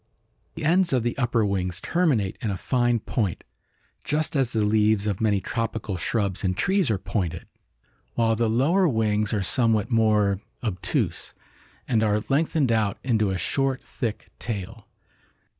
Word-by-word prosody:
"The 160 - -4
ends 175 0 +3
of 125 -3 +2
the 120 - -1
upper 120 -3 +2
wings 90 -2 -2
terminate 140 - +1
in 110 - -1
a 95 - -2
fine 120 -1 +1
point, 105 -8 -2 0.6
just 155 +1 -1
as 135 -4 +1
the 110 -2 +1
leaves 105 0 +2
of 100 -2 -2
many 105 -3 +2
tropical 110 -2 -3
shrubs 100 +2 -1
and 95 -1 0
trees 190 -3 +2
are 110 - +1
pointed, 90 -4 -3 0.7
while 115 -1 +2
the 115 0 +1
lower 160 - +3
wings 105 -5 +1
are 105 -3 0
somewhat 115 +2 +1
more 105 -3 +3 0.2
obtuse, 95 -6 -2 0.5
and 115 -4 +2
are 105 -1 +1
lengthened 145 -2 +2
out 110 -3 +1
into 110 -5 +1
a 95 - -1
short 135 +8 -1
thick 115 -4 -5
tail. 110 0 -6
110 Hz, 155 wpm, -25 LUFS, 100-125 Hz, 0.7 s, ends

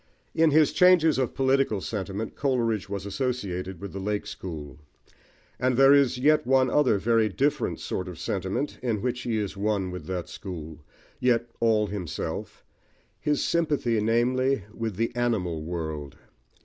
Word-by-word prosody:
In 165 -1 +4
his 155 0 +4
changes 175 -5 +5
of 130 - -1
political 135 -5 +2
sentiment, 100 +2 -4
Coleridge 115 -8 0
was 100 -1 -4
associated 100 -6 -3
with 100 +1 -7
the 95 - -5
"Lake 105 +1 -2
School"; 75 -5 -7 0.8
and 130 -1 +1
there 135 +1 +7
is 140 -3 +4
yet 150 0 +3
one 130 -1 +3
other 130 -8 +3
very 115 +1 +2
different 140 +9 0
sort 90 - -4
of 90 -3 -7
sentiment 100 - -3
in 115 -5 -1
which 125 0 -1
he 115 -3 -1
is 105 -2 -3
one 100 -2 -1
with 90 - -7
that 90 -2 -3
school, 80 -5 -8 0.4
yet 120 -1 +1
all 110 -2 +3
himself, 95 -6 -5 0.5
his 150 -1 0
sympathy, 145 -9 +1
namely, 125 +2 +1
with 115 -3 -3
the 115 +4 -1
animal 100 -10 0
world. 80 -3 -5
115 Hz, 150 wpm, -26 LUFS, 95-130 Hz, 0.8 s, there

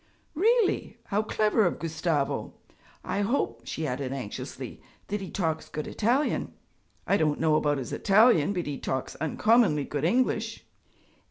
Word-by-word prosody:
'Really? 440 +5 +2
How 205 +1 0
clever 215 0 +2
of 175 - +1
Gustavo! 160 -3 -2 0.5
I 200 - -1
hope,' 200 - 0
she 160 - -3
added 130 -1 -3
anxiously, 130 -7 -6 0.2
'that 205 0 -3
he 190 - -6
talks 160 -4 -2
good 155 - -4
Italian?' 245 +7 0 0.5
'I 200 - +3
don't 150 -4 +1
know 160 -1 +3
about 145 -1 +2
his 130 -4 -5
Italian, 200 -5 +4
but 180 -4 -2
he 145 -2 -4
talks 130 - -3
uncommonly 175 - +3
good 145 0 -4
English.' 225 +3 0
170 Hz, 145 wpm, -27 LUFS, 150-220 Hz, 0.5 s, Italian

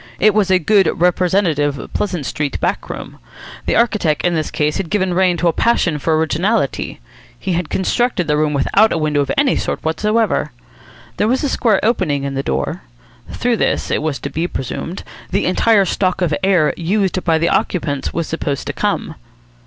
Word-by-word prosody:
It 215 +2 +5
was 205 -2 +2
a 185 - +5
good 190 +1 +3
representative 170 -5 +1
Pleasant 180 -8 -2
Street 145 +1 -3
back - - -2
room. - - -8 0.5
The - - +2
architect 210 -10 +1
in 175 - +2
this 155 -2 -1
case 150 0 -1
had 175 - -4
given 190 -3 0
rein 180 -1 +2
to 175 +2 +1
a 165 - +3
passion 180 -9 +1
for 155 +2 +1
originality. 165 +2 0 0.4
He 185 +8 -3
had 170 -2 -2
constructed 215 - 0
the 150 -1 +1
room 150 0 +1
without 200 +10 +3
a - - 0
window 150 -2 +1
of 140 - -2
any 280 -2 +3
sort - - -3
whatsoever. 210 - 0 0.6
There 210 - +2
was 255 +5 +1
a 285 - +1
square 225 -7 +2
opening 150 - +1
in 140 0 -3
the 135 - -1
door. 70 - -2 0.5
Through 240 -1 0
this, - - 0
it - - +1
was 155 -2 -1
to 140 - -5
be 165 +4 -1
presumed, 165 +5 -5 0.3
the - - 0
entire 200 +2 +3
stock 185 0 0
of 165 -4 +1
air 185 -6 +3
used 185 +1 0
by 165 -2 +2
the 170 +1 +1
occupants 145 -6 -1
was 165 0 -2
supposed 150 -4 -3
to - - -3
come. - - -2
175 Hz, 190 wpm, -18 LUFS, 150-200 Hz, 0.6 s, It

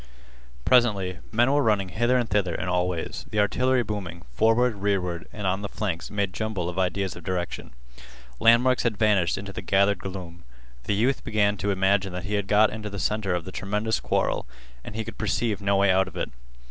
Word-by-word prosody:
Presently, 100 -8 +3
men 120 +4 +3
were 145 +1 +3
running 105 -6 +1
hither 120 +8 +2
and 120 -2 0
thither 95 -4 0
in 85 - -3
all 90 0 +1
ways. 85 -3 -4
The 105 - -1
artillery 125 +5 +2
booming, 95 -6 -5
forward, 115 +1 +3
rearward, 95 -4 -1
and 105 -2 -6
on 95 +1 0
the 100 - -5
flanks 85 -7 -3
made 100 -3 -2
jumble 110 -5 -2
of 90 - -4
ideas 95 +1 -1
of 90 - -10
direction. 90 0 -3 0.7
Landmarks 120 +2 +5
had 115 -3 0
vanished 100 -5 +2
into 100 0 -7
the - - -5
gathered 100 +1 +2
gloom. 90 -3 -8 0.4
The 100 - 0
youth 125 +6 +1
began 105 -2 +1
to 100 - -2
imagine 95 0 +1
that 90 0 -4
he 105 - -4
had 100 -1 0
got 105 +1 +4
into 105 -1 -5
the 100 - -7
center 100 -2 0
of 85 -2 -4
the 95 - -7
tremendous 105 +1 -1
quarrel, - - -1 0.4
and - - -9
he 110 0 -3
could - - -9
perceive 110 0 -1
no 100 0 +2
way 100 -1 +4
out 95 0 +3
of - - -10
it. - - -3
100 Hz, 205 wpm, -25 LUFS, 95-110 Hz, 0.7 s, Landmarks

